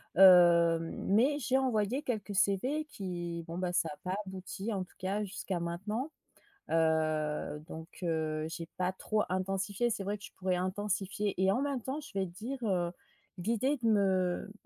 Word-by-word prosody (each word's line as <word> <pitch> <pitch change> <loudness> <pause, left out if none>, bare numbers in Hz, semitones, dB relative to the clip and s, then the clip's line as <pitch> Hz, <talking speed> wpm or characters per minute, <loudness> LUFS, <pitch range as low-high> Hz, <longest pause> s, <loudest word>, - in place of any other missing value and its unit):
hem. 170 -3 +7
Mais 250 +9 +4
j'ai 260 0 +2
envoyé 245 0 +1
quelques 215 -7 -3
CV 255 +12 +2
qui 175 - -5
bon, 170 +2 -4
ça 165 -2 +2
a - - -13
pas 185 +1 -1
abouti 190 +3 -5
en 190 -2 -1
tout - - -18
cas 195 +3 -1
jusqu'à 190 -2 -3
maintenant, 210 - -3 0.6
heu. 155 -2 +1
Donc, 160 +2 -9
heu, 155 -2 0
j'ai 165 0 -6
pas 180 0 +1
trop 210 +3 0
intensifié. 195 +4 0
C'est 210 -3 -2
vrai 205 +2 -2
que 200 - -17
je - - -13
pourrais 185 -1 0
intensifier. 200 +1 -1
Et 190 - +4
en 245 +7 +1
même 280 -4 -1
temps, 270 +5 -3
je 300 - -11
vais 190 - +2
dire, 220 +10 -5
heu, 180 -5 +1 0.5
l'idée 230 +9 +1
de 235 -3 -1
me 190 -2 +2
190 Hz, 170 wpm, -32 LUFS, 175-215 Hz, 0.6 s, hem